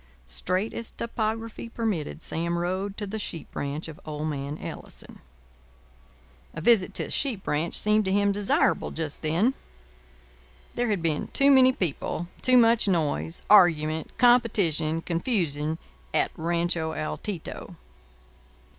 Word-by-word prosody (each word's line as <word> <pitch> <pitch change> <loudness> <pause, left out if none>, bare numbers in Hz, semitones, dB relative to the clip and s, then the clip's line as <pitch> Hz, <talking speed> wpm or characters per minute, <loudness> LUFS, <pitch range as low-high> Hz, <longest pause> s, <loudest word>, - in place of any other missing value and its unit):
Straight 185 - -1
as 230 - -4
topography 225 0 -4
permitted, 200 -10 -3
Sam 170 +1 -2
rode 185 +3 -2
to 210 - -3
the 215 +2 -5
sheep 170 -5 -6
ranch 145 +3 -3
of 160 -2 -10
old 150 0 -4
man 140 0 -4
Ellison. - - -9 1.4
A - - -4
visit 205 -1 +3
to - - 0
a - - -7
sheep 240 -9 -1
ranch 155 +3 0
seemed 210 0 +3
to 190 - 0
him 200 +1 +3
desirable 200 0 +1
just 155 -2 -4
then. 170 +11 +2 1.2
There 245 - 0
had 200 -5 -1
been 160 -3 0
too 280 +1 +5
many 260 -1 +7
people, 175 - -3
too 255 -1 +4
much 230 -2 +5
noise, 145 - 0
argument, 160 -6 +4
competition, 195 - +3
confusion, 165 - -1 0.4
at - - +2
Rancho 170 -1 -1
Altito. 170 +3 -5
175 Hz, 130 wpm, -26 LUFS, 160-220 Hz, 1.4 s, many